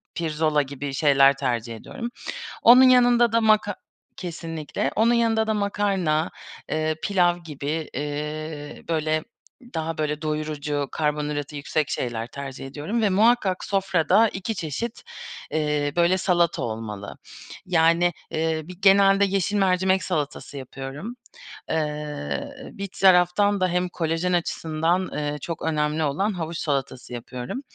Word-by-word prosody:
pirzola 155 -2 +1
gibi 140 0 -5
şeyler 140 -1 +5
tercih 120 -4 -2
ediyorum. 235 - -7 0.5
Onun 245 +3 +9
yanında 245 -2 +5
da 230 - +4
maka 215 -2 +3 0.4
Kesinlikle. 165 -3 -4
Onun 230 +2 +4
yanında 225 -2 +2
da 220 - +1
makarna, 195 -6 0 0.4
eee, 155 0 0
pilav 175 -3 +2
gibi, 155 -1 -4
eee, 150 +1 -5
böyle, 155 -1 0 0.5
daha, 160 0 -3
böyle, 150 0 -2
doyurucu 150 -2 -2
karbonhidratı 150 -1 -2
yüksek 145 +1 -1
şeyler 115 -2 -2
tercih 135 0 -7
ediyorum. 155 - -3
Ve 210 - +4
muhakkak 205 -2 +3
sofrada 195 +2 +3
2 200 +3 -4
çeşit, 210 - -4 0.5
eee, 150 -2 0
böyle, 175 +2 +3
salata 175 -3 +1
olmalı. 110 -3 -5 0.5
Yani, 170 0 +3 0.2
eee, 160 0 -1
bir 180 +3 -10
genelde 195 0 +6
yeşil 195 +1 0
mercimek 190 -1 +2
salatası 150 -4 -3
yapıyorum. 135 - -7 0.5
Eee, 150 - -3 0.2
bir 200 0 -5
taraftan 190 +2 +5
da 185 - +4
hem 180 +1 0
kolajen 165 +1 -1
açısından, 165 +1 0
eee, 150 0 -2
çok 165 -2 -5
önemli 155 0 0
olan 190 +9 0
havuç 165 -2 -4
salatası 135 -4 -3
yapıyorum. 125 - -6
160 Hz, 125 wpm, -24 LUFS, 150-190 Hz, 0.5 s, Onun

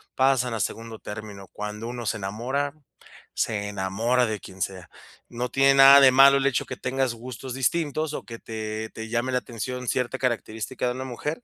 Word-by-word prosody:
pasan 130 -3 +2
a - - -3
segundo 115 -1 -4
término 105 -2 -8
cuando 105 +2 -5
uno 120 -1 -6
se 110 - 0
enamora, 125 +9 -2 0.6
se 105 -2 -1
enamora 110 +6 +1
de 110 -2 -3
quien 95 0 -12
sea. 90 -3 -6 0.4
No 125 +1 -3
tiene 135 0 +4
nada 135 +1 +10
de 130 -1 +8
malo 135 +1 +7
el 135 - 0
hecho 125 - +1
de - - -6
que - - -28
tengas 130 -1 0
gustos 125 +2 -8
distintos, 155 +3 -1
o - - -5
que 115 -2 -9
te 110 0 -5
te 110 0 -7
llame 120 +2 -1
la 125 - +2
atención 125 +1 -6
cierta 125 +2 -1
característica 120 0 -2
de 125 - 0
una 130 +1 -5
mujer, 150 - -5
120 Hz, 195 wpm, -25 LUFS, 110-130 Hz, 0.6 s, nada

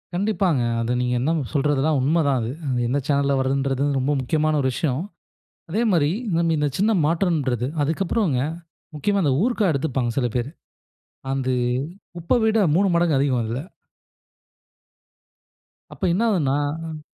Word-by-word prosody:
கண்டிப்பாங்க. 190 - +1 0.2
அதை 115 +1 -1
நீங்க 125 0 0
என்ன 135 +6 0 0.2
சொல்றதெல்லாம் 145 +1 +1
உண்மை 155 +6 +2
தான் 135 -2 +2
அது. 115 +1 -3 0.2
அது 125 -2 0
எந்த 135 +4 0
சேனல்ல 140 -1 +2
வர்ரதுன்றது 135 0 0 0.2
ரொம்ப 135 +3 0
முக்கியமான 155 +3 +1
ஒரு 130 - +1
விஷயம். 140 -1 -1 0.7
அதே 210 +7 0
மாரி 155 -5 +3 0.2
இன்னும் 170 -3 +1
இந்த 150 -1 +1
சின்ன 210 +4 +2
மாற்றன்றது 150 - 0
அதுக்கப்றம்ங்க 165 - 0 0.5
முக்கியமா 200 +6 0
அந்த 145 -5 +2
ஊர்க்கா 230 -6 +1
எடுத்துப்பாங்க 130 -4 -1
சில 125 - +1
பேரு. 125 +2 -1 0.8
அது 130 -1 0 0.7
உப்ப 170 +8 +2
விட 220 0 +3 0.2
மூணு 195 +3 +3
மடங்கு 170 -4 +2
அதிகம் 135 -3 +1
அதுல. 115 +4 -3 2.3
அப்ப - - -13
என்ன 190 - 0
ஆவுதுன்னா 145 -9 +1 0.3
ம். 155 -1 -7
145 Hz, 140 wpm, -23 LUFS, 130-170 Hz, 2.3 s, மாரி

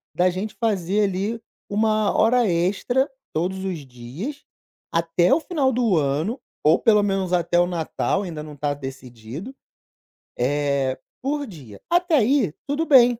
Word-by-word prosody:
da 180 +1 +3
gente 205 +4 -4
fazer 205 -2 +1
ali 200 +4 -1 0.3
1 215 0 +2
hora 235 0 +4
extra 205 - +1 0.2
todos 190 +4 -1
os 180 -4 -2
dias 130 - -7 0.5
até 165 +1 +2
o 315 - +4
final 290 -8 +1
do 225 -8 +2
ano, 155 - 0 0.2
ou 155 +2 +5
pelo 210 -2 +4
menos 195 -2 0
até 175 0 +2
o 175 - +4
Natal, 175 +3 -1
ainda 160 -5 -5
não 150 -1 -9
tá 145 0 -1
decidido, 135 - -8 0.8
eh, 140 0 0 0.2
por 285 +1 -2
dia. 135 - -12
Até 350 -1 +3
aí, 235 - +3
tudo 295 +3 0
bem, 245 -5 +6
190 Hz, 145 wpm, -23 LUFS, 150-235 Hz, 0.8 s, bem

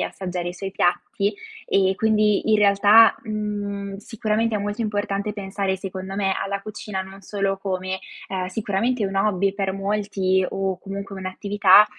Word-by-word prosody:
e - - +1
assaggiare 180 -2 -4
i 175 - -6
suoi 195 0 -5
piatti; 200 +2 0 0.3
e 190 -1 +3
quindi 215 -1 +2
in - - +6
realtà, 205 +2 +6
mhmm, 205 -2 -3
sicuramente 220 +1 -1
è - - +1
molto 205 +3 -2
importante 205 -1 -1
pensare 195 -1 -2
secondo 190 0 -6
me, 195 -1 +1
alla 200 0 -2
cucina 210 -1 -5
non 190 +1 -11
solo 195 -1 -1
come, 190 -1 -3 0.3
ehm, 185 -1 -2
sicuramente 215 +4 -1
un 195 0 -4
hobby 195 -1 +2
per 195 -1 -1
molti 195 -2 0
o 195 -1 -2
comunque 195 0 -6
un'attività, 200 +1 +5
200 Hz, 155 wpm, -23 LUFS, 190-210 Hz, 0.3 s, in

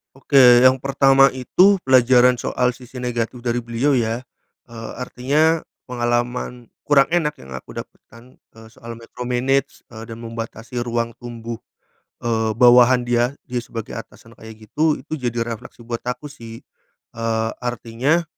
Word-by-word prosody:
Oke 130 -3 +6
yang 130 +1 +6
pertama 135 0 +4
itu 180 +9 +3
pelajaran 125 -1 +5
soal 125 +1 0
sisi 125 0 -9
negatif 120 0 -3
dari 120 0 -1
beliau 120 +4 0
ya, 115 0 -1 0.5
eee, 115 -1 -8
artinya 145 +6 0 0.2
pengalaman 120 0 -2 0.2
kurang 140 -1 +4
enak 165 -3 +1
yang 65 - -14
aku 65 0 -9
dapatkan, 120 +2 -12
eee, 110 0 -18
soal 115 0 -10
micromanage 125 +4 -2
eee 110 -2 -10
dan 115 0 -10
membatasi 115 +1 -7
ruang 115 0 -2
tumbuh, 115 -1 -7 0.7
eee, 110 -2 0
bawahan 125 0 +6
dia, 120 +2 0
dia 125 -3 -3
sebagai 115 -2 -8
atasan 115 0 -10
kayak 110 -1 -13
gitu, 150 +8 +1
itu - - -14 0.2
jadi 115 0 -2
refleksi 120 +1 -8
buat 115 0 -4
aku 145 +4 -5
sih, 115 -4 -11 0.5
eee, 115 -1 -1
artinya 125 +7 -1
120 Hz, 140 wpm, -21 LUFS, 115-130 Hz, 0.7 s, Oke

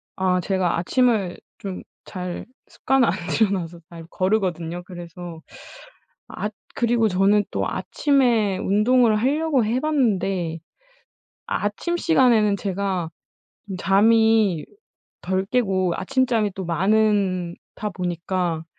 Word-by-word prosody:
아 185 -1 +1
제가 185 -2 0
아침을 215 -2 +1 0.2
좀 190 -2 -6 0.2
잘 180 -1 -5 0.2
습관을 265 -3 +1
안 170 - +2 0.2
들여 215 -3 +2
놔서 170 -3 -4
잘 165 -1 -11
거르거든요. 180 -4 -1
그래서 175 -2 -9 0.9
앗 210 0 -5 0.2
그리고 235 -2 +2
저는 200 +2 +3
또 - - -1
아침에 240 -9 +1
운동을 220 +3 +3
하려고 280 +2 +1
해 230 +4 0
봤는데 195 - 0 0.9
아침 210 +12 -2
시간에는 240 -11 +3
제가 190 -4 -2 0.6
좀 190 -2 -5
잠이 215 -3 +3 0.6
덜 190 +1 -1
깨고 190 -7 +1
아침잠이 240 -2 +1
또 190 -3 -5
많은 190 -1 +1 0.2
다 210 - -4
보니까 175 -2 -2
195 Hz, 225 characters per minute, -23 LUFS, 180-225 Hz, 0.9 s, 저는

